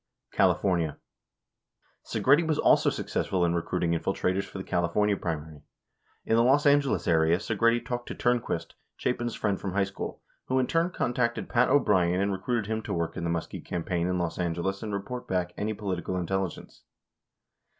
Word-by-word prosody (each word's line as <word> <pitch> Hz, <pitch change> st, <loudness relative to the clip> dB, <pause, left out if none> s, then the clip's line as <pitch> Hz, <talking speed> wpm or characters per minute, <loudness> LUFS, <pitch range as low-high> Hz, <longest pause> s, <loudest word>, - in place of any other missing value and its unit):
55 -, -, -20 dB
California: 85 Hz, -6 st, +2 dB, 1.1 s
Segretti 150 Hz, +5 st, +3 dB
was 155 Hz, -2 st, +1 dB
also -, -, +4 dB
successful 90 Hz, -2 st, -1 dB
in 85 Hz, -, +1 dB
recruiting 85 Hz, 0 st, -1 dB
infiltrators 95 Hz, +3 st, 0 dB
for 100 Hz, -, -9 dB
the 95 Hz, -, -4 dB
California 95 Hz, +5 st, +1 dB
primary. 80 Hz, -4 st, -5 dB, 0.6 s
In 110 Hz, -, +2 dB
the 115 Hz, -, +5 dB
Los 135 Hz, +4 st, +4 dB
Angeles 140 Hz, -1 st, +3 dB
area, 80 Hz, 0 st, +4 dB
Segretti 115 Hz, +3 st, +1 dB
talked 120 Hz, 0 st, -4 dB
.to -, -, -5 dB
Turnquist, 120 Hz, -1 st, -1 dB, 0.2 s
Chapin's 120 Hz, -1 st, -1 dB
friend 100 Hz, -3 st, -1 dB
from 95 Hz, -2 st, -3 dB
high 100 Hz, 0 st, +2 dB
school, 95 Hz, 0 st, -5 dB, 0.3 s
who 130 Hz, -, +1 dB
in 130 Hz, -, +3 dB
turn 165 Hz, +5 st, +1 dB
contacted 120 Hz, -8 st, -1 dB
Pat 125 Hz, +1 st, +3 dB
O'Brien 95 Hz, -10 st, +3 dB
and 100 Hz, +1 st, +1 dB
recruited 105 Hz, +3 st, -1 dB
him 110 Hz, +1 st, -2 dB
to -, -, -4 dB
work 85 Hz, -1 st, -2 dB
in -, -, -4 dB
the -, -, 0 dB
Muskie 85 Hz, -1 st, -3 dB
campaign 85 Hz, 0 st, -2 dB
in 90 Hz, 0 st, 0 dB
Los 85 Hz, -1 st, -2 dB
Angeles 90 Hz, +3 st, -1 dB
and 110 Hz, -2 st, -4 dB
report 110 Hz, +5 st, -5 dB
back 90 Hz, -1 st, -1 dB
any 105 Hz, +1 st, -2 dB
political 95 Hz, -3 st, -3 dB
intelligence. 95 Hz, 0 st, -3 dB
100 Hz, 170 wpm, -28 LUFS, 85-120 Hz, 1.1 s, the